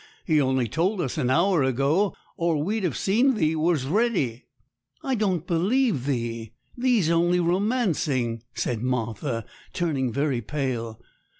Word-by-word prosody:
He 155 -3 +3
only 130 -2 +1
told 185 - 0
us 135 -8 -2
an 125 - 0
hour 170 +4 +3
ago, 140 - +1 0.2
or 170 -2 0
we'd 200 +8 -1
have 175 -7 -1
seen 240 +7 +2
thee 160 -6 +1
was 155 -3 +1
ready.' 145 - 0 0.6
'I 270 - -1
don't 190 -8 0
believe 180 - +1
thee; 115 -4 -3 0.2
thee's 240 -9 +2
only 175 +1 +3
romancing,' 170 - 0
said 115 -3 -2
Martha, 115 -1 -2 0.3
turning 140 -8 -1
very 140 -1 0
pale. 120 -3 -3
155 Hz, 135 wpm, -25 LUFS, 125-190 Hz, 0.6 s, He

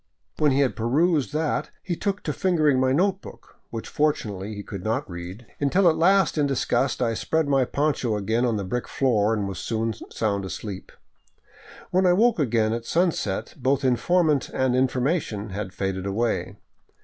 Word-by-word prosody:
When 150 -2 +4
he 135 +2 +3
had 135 - +1
perused 140 - +1
that 155 0 -1
he 175 - -2
took 200 +3 -2
to - - -2
fingering 155 -8 +2
my 130 0 +2
note 190 +7 +1
book, - - -14
which 115 -1 -6
fortunately 110 -9 -1
he 105 - -6
could 100 -3 -7
not 115 +7 -1
read, 90 +6 -8
until 175 +7 +3
at 160 - +4
last 190 -1 +3
in 145 - +3
disgust 130 -1 0
I 115 -1 +1
spread 160 +7 0
my 135 -2 +3
poncho 140 -5 0
again 110 +4 0
on 120 -3 +1
the 100 - -3
brick 120 +6 -3
floor 110 -6 +1
and 105 -3 -1
was 95 -3 -5
soon 115 +2 -1 0.2
sound 100 -3 -1
asleep. 95 +1 -6 1.0
When 185 +1 +3
I 175 - +5
woke 225 +2 +3
again 115 -5 +1
at 115 0 -4
sunset 165 - 0
both 135 -1 0
informant 150 +4 +2
and 130 -1 0
information 130 - 0
had 95 -1 -4
faded 95 0 -3
away. 115 +4 -1
125 Hz, 175 wpm, -24 LUFS, 110-155 Hz, 1.0 s, I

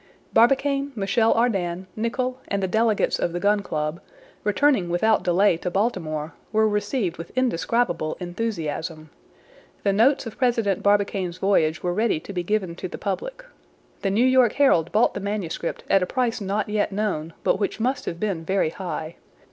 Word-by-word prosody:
Barbicane, 275 +3 +3
Michel 220 +2 +2
Ardan, 190 -6 0
Nicholl, 250 +3 -2
and 200 -1 -1
the - - +1
delegates 220 +2 +1
of 170 - -1
the 175 - -2
Gun 205 +2 +3
Club, 155 -3 -3 0.4
returning 210 -3 +2
without 215 +6 +2
delay 180 0 +3
to 180 - -3
Baltimore, 165 -7 -2 0.2
were 220 0 +3
received 205 -2 -1
with 165 - -8
indescribable 235 -7 0
enthusiasm. 165 -5 -4 0.7
The 200 - +2
notes 255 +7 +3
of 225 - -8
President 230 -7 +1
Barbicane's 200 -3 +1
voyage 165 -5 +1
were 175 -1 0
ready 215 -4 +1
to 200 - -9
be 180 - -1
given 190 -1 -1
to 185 - -4
the - - -7
public. - - -4 0.6
The 195 - 0
New 215 +6 +3
York 255 -3 +4
Herald 175 - +3
bought 220 +3 +3
the - - -4
manuscript 200 -5 -3
at 195 - +4
a 180 - 0
price 245 -4 -1
not 200 +2 -1
yet 210 0 0
known, 195 -6 -2
but - - +2
which 205 - -2
must 255 +4 -1
have 170 - -4
been 195 -5 -2
very 190 -2 +1
high. 170 -3 -5
200 Hz, 170 wpm, -24 LUFS, 175-230 Hz, 0.7 s, York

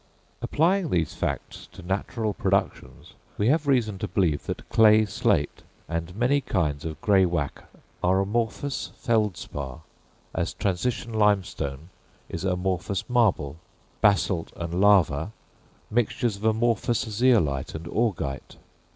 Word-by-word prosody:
Applying 175 +2 +1
these 85 - 0
facts - - -4
to - - -11
natural 105 +4 -2
productions, - - -2 0.2
we 105 +3 +2
have 150 +1 +2
reason 115 -8 +1
to - - -2
believe 85 -7 0
that - - -5
clay 110 -1 +5
slate, 100 - 0 0.3
and 85 +2 -4
many 125 +6 +2
kinds 75 - -1
of 80 -2 -5
greywacke, 90 -7 +1 0.4
are 95 +2 +3
amorphous 115 +7 -2
feldspar, 85 - -2 0.5
as - - -2
transition 115 +5 -2
limestone 95 -8 0 0.4
is 85 - -5
amorphous 95 0 -1
marble, 100 - +1 0.4
basalt 95 -4 +2
and 85 +2 -3
lava 100 -3 +4 0.6
mixtures 115 -1 0
of 105 - -7
amorphous 115 +1 +1
zeolite 105 - +2
and 80 +1 -6
augite. 85 - -2
100 Hz, 115 wpm, -26 LUFS, 85-115 Hz, 0.6 s, clay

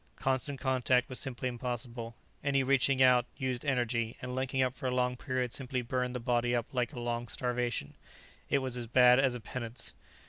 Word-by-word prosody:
Constant 135 +1 -1
contact 130 -2 +2
was 130 - -3
simply 130 -1 -2
impossible; 120 -1 -4 0.3
any 140 -1 +2
reaching 135 0 +4
out 125 -1 +5
used 130 -2 -2
energy, 120 -4 0
and 125 0 -5
linking 130 0 0
up 125 -1 0
for 130 - -4
a - - 0
long 125 0 +1
period 125 -1 -2
simply 125 -2 -1
burned 125 +1 -1
the - - -1
body 120 0 +1
up 120 -2 0
like 125 -1 0
a 130 - -7
long 120 0 -2
starvation; 120 - -2 0.6
it - - +3
was 130 -2 -3
as 120 -1 -3
bad 125 +1 +6
as 135 -2 +3
a - - -4
penance. 120 +1 -5
125 Hz, 195 wpm, -31 LUFS, 120-130 Hz, 0.6 s, bad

